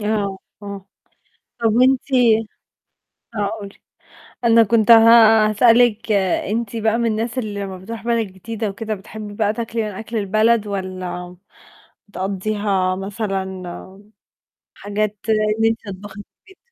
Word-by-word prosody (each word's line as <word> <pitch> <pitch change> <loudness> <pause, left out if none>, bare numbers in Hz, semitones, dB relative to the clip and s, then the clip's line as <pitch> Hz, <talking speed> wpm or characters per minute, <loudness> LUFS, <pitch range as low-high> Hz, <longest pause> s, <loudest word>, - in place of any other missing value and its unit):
آه، 205 -2 -1 0.2
آه، 200 -1 -8 0.7
طَب 225 -2 +2
وأنتِ 255 +1 +4 1.3
آه، 205 -2 -1
قولي. 200 0 -9 0.7
أنا 230 -1 +6
كنت 225 +1 +3
ه - - +11 0.5
هاسألِك 230 0 +3
أنتِ 205 +3 0
بقى 225 0 +1
من 235 - 0
الناس 225 +3 -3
اللي 205 -4 -3
لمّا 190 -1 -6
بتروح 225 +4 -8
بلد 230 -2 0
جديدة 210 +4 -5
وكده 215 +2 -4
بتحبّي 205 +2 -9
بقى 210 0 0
تاكلي 230 -1 -3
من 215 - -3
أكل 220 +3 -6
البلد، 215 +2 +2
والّا 185 -2 -5 0.7
بتقضّيها 195 -1 -1
مثلًا 195 0 -3
م 190 +2 -10 0.6
حاجات 210 +1 -3
إن 215 0 +1
أنتِ 225 0 +1 0.2
تطبخي 200 0 -11
في - - -35 0.2
البيت؟ - - -26
210 Hz, 130 wpm, -20 LUFS, 195-225 Hz, 1.3 s, ه